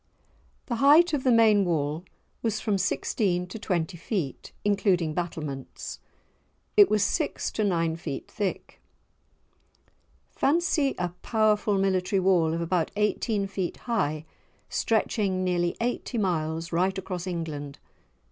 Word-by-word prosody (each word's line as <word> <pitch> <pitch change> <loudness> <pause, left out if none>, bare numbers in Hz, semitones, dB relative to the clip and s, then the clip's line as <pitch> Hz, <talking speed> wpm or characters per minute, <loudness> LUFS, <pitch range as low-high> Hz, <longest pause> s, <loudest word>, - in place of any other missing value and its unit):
The 235 - -2
height 305 +7 +6
of 280 -3 0
the 255 - +4
main 220 -3 +5
wall 155 -2 -1 0.4
was 220 -2 -1
from 205 -3 0
sixteen 185 -1 0
to 200 +5 -8
twenty 175 -3 -2
feet, 170 - -4
including 185 -6 +2
battlements. 150 -6 -5 0.8
It 410 -2 +8
was 210 -2 +3
six 305 - -1
to 215 - -1
nine 165 -5 +1
feet 160 -4 -6
thick. 205 -4 -4 1.5
Fancy 300 -2 +1
a 180 -1 -1
powerful 215 -2 +2
military 190 0 +1
wall 175 -4 +3
of 170 - -2
about 170 -1 0
eighteen 210 0 0
feet 195 -2 -3
high 160 -10 -1 0.4
stretching 205 -4 0
nearly 175 -1 0
eighty 245 +1 -2
miles 165 -4 -1
right 185 +3 +1
across 185 -1 -5
England! 155 -5 -4
190 Hz, 125 wpm, -27 LUFS, 170-215 Hz, 1.5 s, It